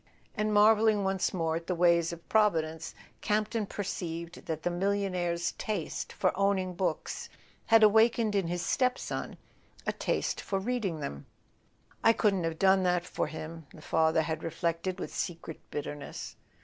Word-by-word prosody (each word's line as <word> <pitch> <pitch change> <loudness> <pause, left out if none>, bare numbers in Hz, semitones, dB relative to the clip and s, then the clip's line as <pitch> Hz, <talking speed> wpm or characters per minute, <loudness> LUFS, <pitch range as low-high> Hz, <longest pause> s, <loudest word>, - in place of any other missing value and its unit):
And, 215 0 0
marvelling 210 0 +5
once 190 -1 0
more 165 -3 -1
at 170 - -8
the 180 - 0
ways 170 -1 +3
of 170 0 -10
Providence, 165 -7 +1 0.3
Campton 215 0 0
perceived 170 -4 -5
that 160 -1 -3
the 175 - 0
mil¬ 195 +3 +1
lionaire's 175 -3 -1
taste 215 - -3
for - - 0
owning 195 -2 +1
books 180 +1 -3 0.4
had 225 -1 +6
awakened 220 +1 +5
in 195 -4 +1
his 175 0 -2
stepson 255 -2 -1 0.5
a - - 0
taste - - -1
for 195 - -2
reading 195 -6 -2
them. 70 - -6 0.8
"I 225 - +7
couldn't 195 -6 +1
have 165 -1 -2
done 190 +1 +5
that 180 -1 +1
for - - -2
him," 160 0 -8
the 155 - -12
father 160 0 +2
had 160 0 -3
reflected 170 +3 -2
with - - -5
secret 165 -2 -4
bitterness. 145 0 -6
180 Hz, 155 wpm, -30 LUFS, 165-205 Hz, 0.8 s, I